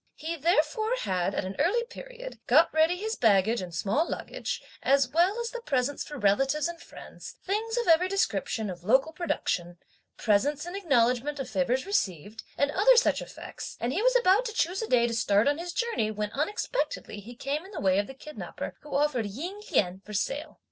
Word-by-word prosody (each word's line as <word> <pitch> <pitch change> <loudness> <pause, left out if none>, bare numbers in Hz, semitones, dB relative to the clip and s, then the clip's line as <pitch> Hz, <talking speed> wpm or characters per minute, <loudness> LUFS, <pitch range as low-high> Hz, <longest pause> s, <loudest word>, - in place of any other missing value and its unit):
He 320 +2 -4
therefore, 340 - +1
had, 185 0 -1
at - - -1
an 190 +1 -5
early 390 +11 +2
period, - - -10
got - - +5
ready 320 +3 +3
his 440 +4 -3
baggage 220 0 +3
and 180 -1 -6
small 210 - 0
luggage, - - -4 0.2
as 275 -1 +3
well 355 - +2
as 470 -1 -3
the - - -6
presents 275 - -1
for 295 - -8
relatives 270 +8 +2
and 340 -1 -7
friends, - - -11
things 445 +4 -1
of 475 - 0
every 345 +2 +5
description 225 - -1
of 175 -1 -10
local 265 - +3
production, 175 - -2 0.4
presents 275 +9 +1
in 350 +2 -6
acknowledgment 275 -5 +1
of 270 - -3
favours 260 0 0
received, 210 - -2 0.2
and 285 0 +2
other 430 +9 +5
such 475 - +3
effects, - - -8
and 240 +2 -1
he 380 - 0
was - - +3
about 435 -2 +5
to 445 - -4
choose 375 -2 0
a 450 - -3
day 240 - +4
to 235 - -1
start 210 0 +3
on 290 +2 +2
his 350 +1 -4
journey 465 - -1
when 210 -1 -3
unexpectedly 410 - -2
he 230 +4 -11
came 280 +6 -3
in 380 - -12
the 410 - -6
way 190 0 +3
of 205 - -1
the 270 - -10
kidnapper 300 +3 -7
who 295 - -7
offered 280 -6 +1
Ying 340 - -6
Lien 190 - +1
for 210 - -10
sale. 285 +9 -3
290 Hz, 200 wpm, -28 LUFS, -, 0.4 s, got